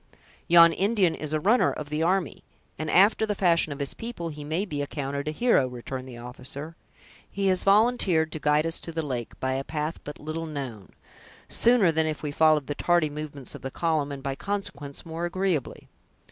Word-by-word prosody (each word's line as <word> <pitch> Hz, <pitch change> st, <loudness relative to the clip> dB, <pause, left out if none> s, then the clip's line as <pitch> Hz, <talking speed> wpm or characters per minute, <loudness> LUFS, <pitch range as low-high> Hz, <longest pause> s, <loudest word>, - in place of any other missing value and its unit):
"Yon 170 Hz, -1 st, +7 dB
Indian 195 Hz, -3 st, +2 dB
is 155 Hz, -1 st, -6 dB
a 155 Hz, -, +1 dB
'runner' 220 Hz, +10 st, +3 dB
of 150 Hz, -1 st, -7 dB
the 150 Hz, +1 st, -1 dB
army; 180 Hz, +2 st, 0 dB, 0.4 s
and, 155 Hz, 0 st, -3 dB
after 200 Hz, +6 st, +5 dB
the 210 Hz, -1 st, 0 dB
fashion 170 Hz, -5 st, +2 dB
of 140 Hz, -, -5 dB
his 140 Hz, -1 st, -3 dB
people, 225 Hz, -8 st, -6 dB
he 150 Hz, -1 st, -8 dB
may 160 Hz, +7 st, -1 dB
be 150 Hz, -7 st, -4 dB
accounted 140 Hz, 0 st, -4 dB
a -, -, 0 dB
hero," 190 Hz, -, +3 dB
returned 130 Hz, +1 st, -7 dB
the 120 Hz, -, -9 dB
officer. 130 Hz, +6 st, -7 dB, 0.5 s
"He 200 Hz, 0 st, -3 dB
has 185 Hz, -1 st, +2 dB
volunteered 195 Hz, -6 st, +3 dB
to 155 Hz, -, -5 dB
guide 150 Hz, +1 st, +2 dB
us 165 Hz, 0 st, 0 dB
to 165 Hz, -, -6 dB
the 160 Hz, -1 st, -3 dB
lake, 125 Hz, -5 st, -5 dB
by 130 Hz, 0 st, -1 dB
a 135 Hz, +1 st, -2 dB
path 155 Hz, +2 st, -3 dB
but 150 Hz, -, -8 dB
little 160 Hz, +2 st, -5 dB
known, 130 Hz, -10 st, -6 dB, 0.6 s
sooner 230 Hz, -7 st, +4 dB
than 160 Hz, 0 st, +1 dB
if 155 Hz, 0 st, -4 dB
we 150 Hz, -, -2 dB
followed 155 Hz, -1 st, +3 dB
the 145 Hz, -, -3 dB
tardy 170 Hz, 0 st, +1 dB
movements 145 Hz, -3 st, -6 dB
of -, -, -9 dB
the 135 Hz, -, -4 dB
column; 155 Hz, -1 st, -1 dB
and, 135 Hz, -1 st, -7 dB
by 135 Hz, -1 st, -2 dB
consequence, 145 Hz, -6 st, -4 dB
more 165 Hz, +1 st, -4 dB
agreeably." 175 Hz, -5 st, -2 dB
155 Hz, 200 wpm, -26 LUFS, 140-175 Hz, 0.6 s, Yon